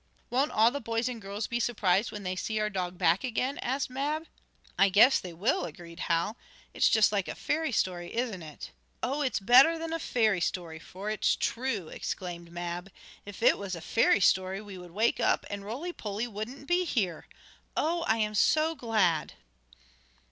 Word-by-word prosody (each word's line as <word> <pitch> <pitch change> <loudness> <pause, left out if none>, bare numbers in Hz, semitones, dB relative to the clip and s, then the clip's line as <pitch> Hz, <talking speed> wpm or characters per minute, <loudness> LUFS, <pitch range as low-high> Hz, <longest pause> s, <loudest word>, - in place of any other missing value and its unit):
"Won't 270 +5 +1
all 225 +2 +4
the 285 +2 -4
boys 230 +1 -1
and 240 -3 -5
girls 200 +2 -4
be 240 - -2
surprised 210 -4 +1
when 210 -1 -7
they 185 0 -2
see 215 +3 -2
our 210 0 0
dog 180 -2 -3
back 175 0 +3
again?" 255 +2 -1
asked 265 +2 -1
Mab. 295 +5 -2 0.5
"I 195 - +5
guess 215 +8 +6
they 180 - -8
will," 180 +3 0
agreed 170 +1 -10
Hal. 170 +7 +1 0.4
"It - - -11
is - - +6
just 220 -2 +4
like 200 -3 0
a - - -5
fairy 315 -1 -1
story; 175 -5 -1
isn't 230 -6 -2
it?" 155 -2 -9 0.3
"Oh, 280 +4 -1
it's 265 -5 0
better 255 +11 +6
than 325 0 -4
a 330 - -1
fairy 220 - +1
story, 165 -2 -3
for 190 +6 -6
it's 215 - +2
true!" 230 -9 -2
exclaimed 170 -2 -5
Mab. 175 +2 -5 0.4
"If 205 +2 -8
it - - +5
was 195 -2 -4
a - - -7
fairy 220 +2 +3
story 190 +1 +2
we 205 -2 -9
would 180 -1 -10
wake 220 +8 +1
up 230 - +2
and 200 -1 -5
Roly 270 - -5
Poly 210 -2 -4
wouldn't 235 +6 -7
be 355 +1 +2
here. 195 - -2 0.5
Oh! 335 +2 +1
I 220 - +3
am 215 -1 0
so 310 +9 +3
glad!" 215 - +1
215 Hz, 190 wpm, -29 LUFS, 185-250 Hz, 0.5 s, guess